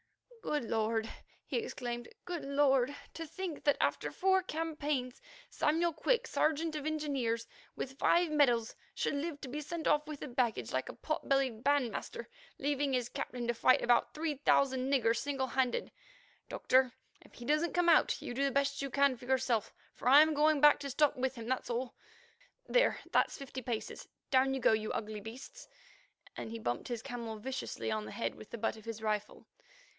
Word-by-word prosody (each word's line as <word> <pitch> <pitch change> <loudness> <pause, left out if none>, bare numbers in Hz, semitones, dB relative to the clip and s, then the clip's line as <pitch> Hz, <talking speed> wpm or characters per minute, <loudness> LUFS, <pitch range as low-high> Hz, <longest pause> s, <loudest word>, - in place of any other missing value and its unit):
"Good 300 - -1
Lord!" 225 0 0 0.4
he - - -1
exclaimed, 240 - -5 0.2
"good 350 -2 -4
Lord! 275 -1 +2 0.2
to 330 -1 -6
think 340 -1 -5
that, 290 - +3
after - - 0
four 380 0 +3
campaigns, 300 - -3 0.3
Samuel 330 +3 +1
Quick, 475 +10 +1
Sergeant 315 -4 0
of 300 0 -3
Engineers, 275 -7 -1 0.3
with 270 +1 -6
five 345 -2 +3
medals, 245 -7 +3 0.2
should - - 0
live 290 +1 -3
to 275 - -6
be 295 +4 -4
sent 320 +2 -4
off 300 0 +3
with 305 -2 -6
the - - -4
baggage 240 - -1
like 130 0 -1
a - - -7
pot 310 - -4
bellied 265 -5 +1
bandmaster, 280 -5 0 0.3
leaving 285 0 0
his 250 -2 0
captain 245 -1 -4
to 240 - +2
fight 255 +2 +4
about 240 0 +3
three 310 0 -1
thousand 270 -1 +2
niggers 230 -4 +3
single 275 0 -1
handed. 260 -2 0 0.6
Doctor, 255 0 +3 0.3
if - - -19
he 240 - -9
don't 305 +5 +2
come 355 -1 +1
out, 335 - +5
you - - -6
do 270 +3 0
the 275 - +2
best 280 +1 0
you 275 - -2
can 280 0 +3
for 245 - -13
yourself, 255 -4 +1 0.2
for 245 - -1
I'm 305 +4 +8
going 300 0 +3
back 295 0 +7
to 280 -1 -5
stop 290 +2 +3
with 260 0 -1
him, 230 -2 -7
that's 260 +1 -2
all. 245 +1 -2 0.7
There, - - +3
that's - - +2
fifty 265 -2 -7
paces; 230 -2 -4 0.2
down 270 0 +4
you - - -2
go, 235 - +4
you 215 0 -1
ugly 215 -1 -4
beasts," 245 - -10 0.7
and - - -6
he 230 - -5
bumped 120 - -3
his 240 -3 -4
camel 230 -2 -5
viciously 260 0 -4
on 215 -1 -2
the - - -8
head 235 - -2
with 215 - -13
the 235 - -6
butt 225 0 -1
of 220 - -14
his 225 -1 -6
rifle. 210 -1 -2
270 Hz, 190 wpm, -33 LUFS, 240-300 Hz, 0.7 s, I'm